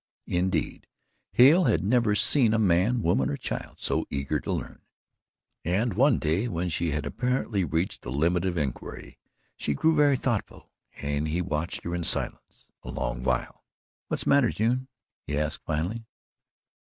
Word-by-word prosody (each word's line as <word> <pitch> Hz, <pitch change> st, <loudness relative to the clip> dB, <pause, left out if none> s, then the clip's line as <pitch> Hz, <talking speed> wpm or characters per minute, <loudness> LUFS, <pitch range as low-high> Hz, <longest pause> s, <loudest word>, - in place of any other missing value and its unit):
Indeed, 90 Hz, -2 st, -1 dB, 0.5 s
Hale 155 Hz, +9 st, +7 dB
had 85 Hz, -, +2 dB
never 110 Hz, 0 st, +2 dB
seen 115 Hz, 0 st, +3 dB
a -, -, +3 dB
man, 105 Hz, +4 st, +3 dB
woman 65 Hz, -6 st, +2 dB
or 70 Hz, -, -2 dB
child -, -, -5 dB
so -, -, -1 dB
eager 70 Hz, -1 st, -1 dB
to -, -, -4 dB
learn, -, -, -4 dB, 0.8 s
and 100 Hz, +6 st, 0 dB
one 135 Hz, +9 st, +4 dB
day, 85 Hz, +9 st, 0 dB
when 90 Hz, -4 st, -2 dB
she 85 Hz, +1 st, -1 dB
had 75 Hz, 0 st, -2 dB
apparently 125 Hz, -, -1 dB
reached 80 Hz, +3 st, -1 dB
the -, -, -7 dB
limit 85 Hz, +6 st, +1 dB
of 90 Hz, -2 st, -1 dB
inquiry, 70 Hz, -5 st, -5 dB, 0.4 s
she 75 Hz, -, -2 dB
grew 160 Hz, -, +3 dB
very 145 Hz, -2 st, +4 dB
thoughtful 120 Hz, -5 st, -3 dB, 0.2 s
and 70 Hz, +1 st, -2 dB
he 80 Hz, +3 st, -1 dB
watched 85 Hz, -1 st, -2 dB
her 85 Hz, -, -4 dB
in 85 Hz, -1 st, -2 dB
silence -, -, -3 dB
a -, -, -10 dB
long -, -, -3 dB
while. 65 Hz, -1 st, -2 dB, 0.4 s
"What's -, -, -1 dB
the -, -, +1 dB
matter, 140 Hz, -5 st, +5 dB
June?" 125 Hz, +4 st, 0 dB, 0.4 s
he 75 Hz, -, -2 dB
asked 75 Hz, 0 st, -2 dB
finally. 95 Hz, +10 st, -2 dB
90 Hz, 165 wpm, -27 LUFS, 75-115 Hz, 0.8 s, Hale